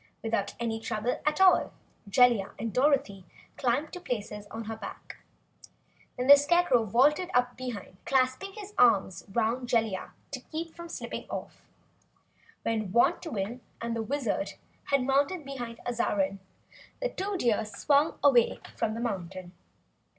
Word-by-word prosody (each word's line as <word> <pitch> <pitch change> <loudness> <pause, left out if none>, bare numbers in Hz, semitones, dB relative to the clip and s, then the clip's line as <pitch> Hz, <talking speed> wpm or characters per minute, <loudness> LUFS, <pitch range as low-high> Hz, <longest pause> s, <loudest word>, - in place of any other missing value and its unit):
Without 225 -3 -1
any 225 -1 -2
trouble 220 +2 -2
at 300 +3 +1
all, 380 -1 +5 0.4
Jellia 235 -3 +4
and 225 -1 -4
Dorothy 260 -8 +2 0.3
climbed 270 +5 0
to 360 - -5
places 210 - -5
on 225 0 -6
her 225 +1 -5
back. 210 -2 -9 1.0
Then 250 - -1
the 285 +2 +10
Scarecrow 290 -5 +3
vaulted 290 - +3
up 245 0 +2
behind, 245 -7 -7
clasping 265 +9 +1
his 415 -1 -9
arms 195 -7 +4
'round 235 +3 0
Jellia 220 -5 0 0.2
to 275 - -4
keep 320 +5 -6
from 340 0 -9
slipping - - -6
off. - - -6 1.0
When 215 -4 -1
Wantowin 240 - +1 0.2
and 230 0 -3
the 230 - -1
Wizard 275 +3 -2 0.3
had 275 -2 +2
mounted 285 +5 +1
behind 245 -4 -6
Azarine, 195 -5 0 0.6
the - - -1
two 395 -1 -3
Deer 230 -8 +2
swung 280 +9 +1
away 250 -5 +4 0.2
from 220 -1 -1
the 230 - -4
mountain. 185 -5 -4
245 Hz, 140 wpm, -29 LUFS, 220-285 Hz, 1.0 s, the